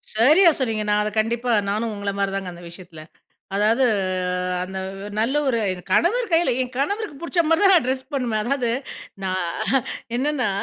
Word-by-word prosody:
சரியா 305 - +6
சொன்னீங்க! 225 -5 -1
நான் 210 0 +3
அத 210 - -1
கண்டிப்பா 235 +2 0 0.2
நானும் 215 +2 -1
உங்கள 200 0 -3
மாரிதாங்க 195 -2 -2
அந்த 175 - -12
விஷயத்தில. 170 -2 -12 0.5
அதாவது, 220 +6 +3 0.8
அந்த 190 +1 -6 0.4
நல்ல 235 +6 +1
ஒரு 235 -3 +1 0.3
கணவர் 455 - +2
கையில 330 -4 +3
என் 255 0 -4
கணவருக்கு 400 +2 -2
பிடிச்ச 340 +1 +1
மாரிதான் 385 +5 +5
நான் 340 -9 +4
ட்ரெஸ் 260 0 -1
பண்ணுவேன். 240 -6 -1
அதாவது, 245 0 0 0.5
நா 190 - -1 0.9
என்னென்னா 265 -3 0
240 Hz, 145 wpm, -22 LUFS, 210-290 Hz, 0.9 s, சரியா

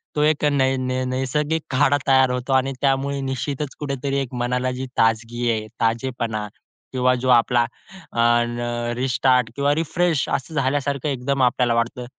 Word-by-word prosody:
तो 150 - +1
एक 150 0 +2
नै 135 -1 +2
नै 130 0 -1
नैसर्गिक 140 +5 -1
काढा 145 +2 +3
तयार 130 -1 +5
होतो 125 +2 -2
आणि 130 +1 +2
त्यामुळे 140 0 +1
निश्चितच 140 +2 -3
कुठेतरी 140 -1 -2
एक 130 -2 -6
मनाला 125 +1 0
जी 130 - -3
ताजगी 115 +2 +1
आहे, 110 -1 -2
ताजेपणा 115 -2 -1 0.4
किंवा 130 0 +2
जो 130 - +1
आपला 120 0 +3 0.5
अ, - - -3 0.4
र 120 0 -3
रिस्टार्ट 125 -1 +2
किंवा 140 +1 +1
रिफ्रेश 165 -1 0
असं 135 +4 -2
झाल्यासारखं 140 0 0
एकदम 135 0 -1
आपल्याला 125 -1 +2
वाटतं. 120 +1 -1
130 Hz, 155 wpm, -22 LUFS, 120-140 Hz, 0.5 s, तयार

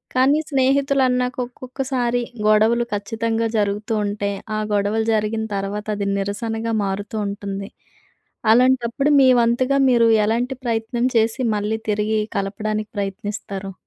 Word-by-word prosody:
కానీ 275 +4 +4
స్నేహితులు 275 0 +2
అన్నాక 250 0 -1
ఒక్కొక్కసారి 250 -1 -2 0.3
గొడవలు 220 +3 +4
ఖచ్చితంగా 225 +2 -1
జరుగుతూ 210 +1 -1
ఉంటే 205 0 -2 0.3
ఆ - - -1
గొడవలు 205 +2 +1
జరిగిన 220 +1 0
తర్వాత 200 +2 -3
అది 200 -1 -2
నిరసనగా 225 +3 -3
మారుతూ 200 +3 -4
ఉంటుంది. 200 -1 -5 0.8
అలాంటప్పుడు, 255 +2 +2
మీ 260 - +6
వంతుగా 255 +4 +2
మీరు 235 -2 +4 0.2
ఎలాంటి 240 +4 0
ప్రయత్నం 230 +1 -1
చేసి 225 +3 +1
మళ్ళీ 210 +2 -1
తిరిగి 215 +1 +1 0.2
కలపడానికి 215 +2 -2
ప్రయత్నిస్తారు? 200 -1 -4
225 Hz, 115 wpm, -21 LUFS, 205-245 Hz, 0.8 s, మీ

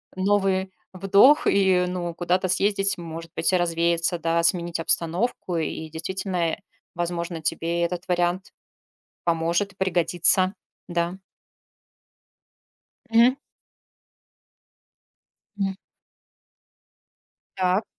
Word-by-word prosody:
новый 190 -1 +1 0.2
вдох 200 - +5
и, 190 -2 +3
ну 175 -1 -4
куда-то 180 +2 0
съездить, 195 +1 +1
может 165 -1 -8
быть, - - 0
и 185 - +5
развеяться, 170 0 0
да, 165 +1 0
сменить 170 -1 +1
обстановку. 175 +3 0
И 160 0 -4
действительно, 185 +4 -4
э, - - -4 0.4
возможно, 170 -1 -3
тебе 165 +2 -1
этот 175 +1 -2
вариант 175 +2 0 0.7
поможет 170 +4 0
и - - -31
пригодится. 185 +1 +2 0.3
Да. 170 0 -1 2.0
Мгм. 235 +3 +5 2.2
М. 195 -1 -1 1.8
Так. 185 +3 +1
175 Hz, 90 wpm, -24 LUFS, 170-190 Hz, 2.2 s, вдох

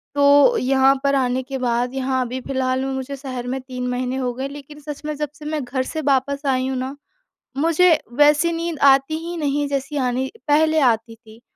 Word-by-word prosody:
तो 285 +11 +5
यहाँ 265 +1 +3
पर 280 0 +2
आने 255 -1 +1
के 270 +1 -5
बाद, 245 0 -1
यहाँ 260 -1 -1
अभी 255 +2 -5
फिलहाल 260 0 -1
में 270 - -2
मुझे 265 +1 -4
शहर 255 -3 -6
में 265 +1 -2
3 250 -1 -5
महीने 250 +1 -2
हो 250 -2 -2
गए। 265 +2 -4
लेकिन 290 +1 -11
सच 295 -1 -8
में 305 - -2
जब 300 0 -3
से 300 -1 -12
मैं 305 -2 -2
घर 260 +1 -2
से 315 +4 -4
वापस 280 +1 0
आई 260 -1 +1
हूँ 265 -1 -2
ना, 260 +2 -4 0.6
मुझे 335 +4 +4 0.3
वैसी 295 +3 +4
नींद 330 -2 -3
आती 270 +4 +1
ही 345 +1 -5
नहीं, 290 -1 0
जैसी 280 +1 -3
आनी 255 0 -1 0.2
पहले 315 +2 +3
आती 230 -3 +1
थी 225 0 -18
270 Hz, 210 wpm, -21 LUFS, 255-295 Hz, 0.6 s, तो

